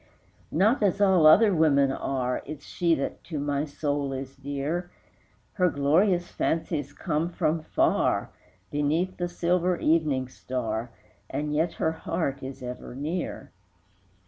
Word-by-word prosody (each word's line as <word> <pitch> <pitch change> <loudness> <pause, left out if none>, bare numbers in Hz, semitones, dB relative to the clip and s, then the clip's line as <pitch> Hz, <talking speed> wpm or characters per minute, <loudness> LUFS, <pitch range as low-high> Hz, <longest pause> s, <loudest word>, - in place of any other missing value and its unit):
Not 215 - +3
as 200 -1 +2
all 190 -6 +5
other 205 +6 +7
women 140 -5 +4
are 130 -2 -2
Is 150 -1 -8
she 170 -2 +1
that 135 - -4
to 160 - -5
my 145 0 -1
soul 145 -2 -2
is 135 0 -6
dear; 145 +6 -3 0.6
Her 180 -2 +3
glorious 175 +6 +2
fancies 155 -3 -1
come 160 +2 -1
from 165 -2 0
far, - - +1 0.4
Beneath 155 +6 0
the 175 - -1
silver 175 +1 +1
evening 150 -6 +1
star, 120 -3 -4 0.4
And 150 0 -2
yet 160 +3 +1
her 160 - 0
heart 160 -3 -3
is 135 0 -7
ever 125 0 -7
near. 160 +6 -4
155 Hz, 135 wpm, -27 LUFS, 140-175 Hz, 0.6 s, other